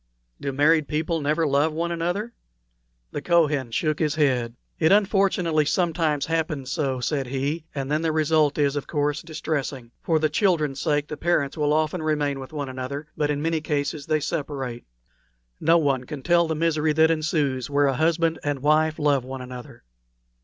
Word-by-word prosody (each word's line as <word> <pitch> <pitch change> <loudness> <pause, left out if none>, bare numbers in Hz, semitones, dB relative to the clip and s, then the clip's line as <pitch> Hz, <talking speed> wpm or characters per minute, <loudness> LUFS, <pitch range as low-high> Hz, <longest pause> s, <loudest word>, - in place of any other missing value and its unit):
"Do 140 - -3
married 150 +2 +3
people 160 +2 -1
never 155 +3 +1
love 145 +2 +2
one 170 +2 -2
another?" 175 +7 -2 0.8
The 145 - -4
Kohen 150 -6 +2
shook 155 +6 -1
his 150 -2 0
head. 125 -6 +1 0.2
"It 160 0 +3
unfortunately 195 -6 +3
sometimes 160 -3 +1
happens 155 -5 -2
so," 140 -5 -1
said 135 0 -1
he, 140 +5 -2
"and 135 0 -3
then 155 +1 +1
the 165 -1 +1
result 155 -1 +2
is, 145 -1 +2
of 145 - -3
course, 145 -1 -1
distressing. 145 -6 -4
For 165 - +1
the 155 0 +2
children's 155 -5 +1
sake 150 -2 0
the 150 - -6
parents 155 -5 0
will 150 -2 +1
often 155 +2 +1
remain 150 -3 0
with 130 - -9
one 145 -3 -4
another, 130 +3 -6
but 150 -1 0
in 145 0 -1
many 165 -1 0
cases 145 -1 -2
they 155 - +2
separate. 140 -6 -4 0.7
No 165 +2 +4
one 135 -5 +1
can 140 0 -7
tell 170 -1 +3
the 160 - -1
misery 155 -1 +1
that 160 +1 +4
ensues 150 -5 0
where 145 0 +3
a 135 - +2
husband 165 +3 +1
and 145 -2 -2
wife 155 +1 +3
love 145 -4 +2
one 130 0 -7
another." 125 -1 -10
150 Hz, 180 wpm, -24 LUFS, 140-160 Hz, 0.8 s, No